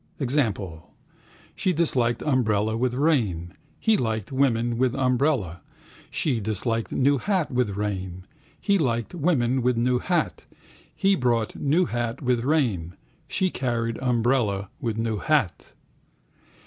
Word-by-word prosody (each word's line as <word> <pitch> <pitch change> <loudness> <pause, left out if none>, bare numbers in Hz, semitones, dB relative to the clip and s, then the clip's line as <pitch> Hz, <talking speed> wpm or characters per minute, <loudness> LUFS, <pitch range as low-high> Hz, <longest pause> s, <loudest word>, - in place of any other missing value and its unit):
Example? 105 - -2 0.6
She 185 - 0
disliked 125 -8 +1
umbrella 110 -6 +1
with 125 +1 0
rain, 110 - +1 0.3
he 220 -1 +3
liked 110 - -2
woman 120 -3 +1
with 130 -1 +2
umbrella, 125 - +1 0.5
she 130 -7 0
disliked 110 +2 -2
new 140 +1 +2
hat 185 -4 0
with 120 -6 0
rain, 95 -3 -4 0.3
he 200 -2 +2
liked 120 -4 -1
woman 135 -7 +1
with 125 0 +1
new 125 +1 +2
hat, 155 - -1 0.5
he 195 +1 +3
bought 120 - 0
new 155 +6 +2
hat 120 -4 -3
with 125 -3 +1
rain, 115 - 0 0.3
she 185 +7 0
carried 115 -3 -2
umbrella 120 -5 +1
with 115 -2 -2
new 115 -1 -1
hat. 135 - 0
120 Hz, 125 wpm, -25 LUFS, 110-140 Hz, 0.6 s, he